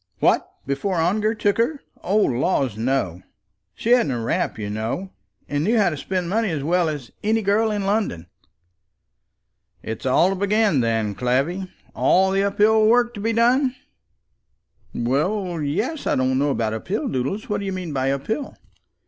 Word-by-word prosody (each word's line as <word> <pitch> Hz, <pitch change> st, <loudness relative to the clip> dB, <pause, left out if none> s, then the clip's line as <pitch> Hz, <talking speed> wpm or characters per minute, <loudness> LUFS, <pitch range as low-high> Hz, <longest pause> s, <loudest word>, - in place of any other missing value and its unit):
"What! -, -, +2 dB, 0.2 s
before 140 Hz, +8 st, -1 dB
Ongar 210 Hz, +7 st, +1 dB
took 205 Hz, 0 st, 0 dB
her? 280 Hz, +6 st, +1 dB, 0.2 s
O 195 Hz, +4 st, 0 dB
laws, 130 Hz, -, +1 dB
no. 110 Hz, -7 st, -1 dB, 0.5 s
She 230 Hz, -, -2 dB
hadn't 245 Hz, -, +4 dB
a 120 Hz, -, -2 dB
rap, 115 Hz, -, -1 dB
you 105 Hz, -2 st, -4 dB
know; 110 Hz, -, -3 dB, 0.4 s
and 145 Hz, +1 st, -1 dB
knew 225 Hz, +7 st, +2 dB
how 200 Hz, -5 st, +3 dB
to -, -, -3 dB
spend 180 Hz, +5 st, -3 dB
money 215 Hz, +3 st, 0 dB
as 155 Hz, -5 st, -2 dB
well 170 Hz, +2 st, +2 dB
as 145 Hz, -6 st, -6 dB
any 220 Hz, +1 st, +1 dB
girl 210 Hz, +3 st, +2 dB
in 205 Hz, -2 st, -2 dB
London." 200 Hz, -, -1 dB, 1.6 s
"It's 110 Hz, +4 st, -5 dB
all 165 Hz, +8 st, +4 dB
to -, -, -1 dB
begin 200 Hz, -4 st, +2 dB
then, 115 Hz, -3 st, 0 dB
Clavvy; 140 Hz, -, -1 dB, 0.2 s
all 190 Hz, +1 st, +3 dB
the 195 Hz, 0 st, +2 dB
up 200 Hz, 0 st, -1 dB
hill 215 Hz, +1 st, +5 dB
work 240 Hz, +1 st, +3 dB
to -, -, -8 dB
be 225 Hz, +2 st, 0 dB
done?" 250 Hz, +3 st, +3 dB, 1.2 s
"Well, 170 Hz, -, -1 dB
yes; 215 Hz, -, -2 dB
I -, -, +2 dB
don't 130 Hz, 0 st, +1 dB
know 145 Hz, +1 st, +2 dB
about 115 Hz, -5 st, -1 dB
up 110 Hz, -, -6 dB
hill, 200 Hz, +4 st, -1 dB
Doodles. 140 Hz, -, -2 dB
What 210 Hz, -3 st, -1 dB
do 200 Hz, -, -5 dB
you -, -, -2 dB
mean 180 Hz, -4 st, -5 dB
by 135 Hz, -1 st, 0 dB
up 140 Hz, 0 st, -3 dB
hill?" 265 Hz, +5 st, -3 dB
185 Hz, 180 wpm, -22 LUFS, 135-215 Hz, 1.6 s, hill